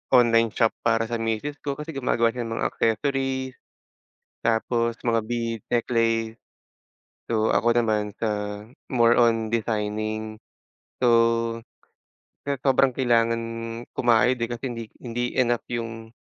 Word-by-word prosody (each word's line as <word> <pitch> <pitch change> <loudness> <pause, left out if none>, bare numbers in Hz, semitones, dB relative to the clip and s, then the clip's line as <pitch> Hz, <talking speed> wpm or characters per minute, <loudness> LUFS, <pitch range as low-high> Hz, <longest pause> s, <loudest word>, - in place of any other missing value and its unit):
online 115 -2 +5
shop 115 -1 +3
para 115 -1 +2
sa 115 - -1
misis 115 +6 -2
ko 140 -1 -3
kasi 150 +3 -6
gumagawa 120 -4 +1
siya 120 -1 -4
ng 115 - -4
mga - - 0
accessories. 130 +2 -1 0.9
Tapos 115 +1 0
mga 115 -1 +2
bead 115 -2 -2
necklace. 115 -1 +1 0.9
So 110 -1 +2
ako 120 0 +3
naman 110 -3 +1
sa 105 -1 -2 0.3
more 120 -2 +4
on 115 -2 +3
designing, 110 -1 -2 0.6
so, 125 - +4 1.4
kaya 140 -1 -1
sobrang 135 -1 +3
kailangan 115 -2 +2 0.5
kumayod 120 +1 +3
eh, 115 - -1
kasi 120 +1 -6
hindi 115 -1 -6 0.2
hindi 120 0 -3
enough 120 -2 +2
yung 115 -1 -5
115 Hz, 125 wpm, -25 LUFS, 115-120 Hz, 1.4 s, online